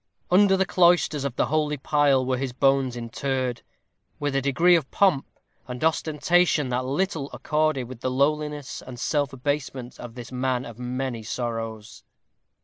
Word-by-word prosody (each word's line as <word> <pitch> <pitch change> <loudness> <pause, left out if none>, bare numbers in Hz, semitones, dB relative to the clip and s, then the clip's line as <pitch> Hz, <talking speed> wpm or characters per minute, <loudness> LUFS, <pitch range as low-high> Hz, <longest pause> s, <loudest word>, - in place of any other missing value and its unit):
Under 195 +1 +5
the 190 - +2
cloisters 175 -6 +3
of 135 -3 -3
the - - +2
holy 150 0 0
pile 140 -2 +2
were 130 -1 0
his 130 -2 -3
bones 135 -1 +2
interred, 125 +1 -2 0.6
with 145 -1 -1
a 135 - +2
degree 165 +6 +4
of 155 -6 0
pomp 185 -9 +2 0.4
and 125 +1 -6
ostentation 160 -1 +2
that 125 +1 -1
little 145 +1 -1
accorded 155 -3 0
with 125 -1 -9
the 130 - -2
lowliness 150 +1 -1
and 125 -1 -10
self 145 0 0
abasement 135 -2 -4
of 120 -1 -9
this 120 -1 -9
man 130 0 -1
of 115 0 -10
many 125 -1 -3
sorrows. 115 -2 -5
135 Hz, 155 wpm, -25 LUFS, 125-150 Hz, 0.6 s, Under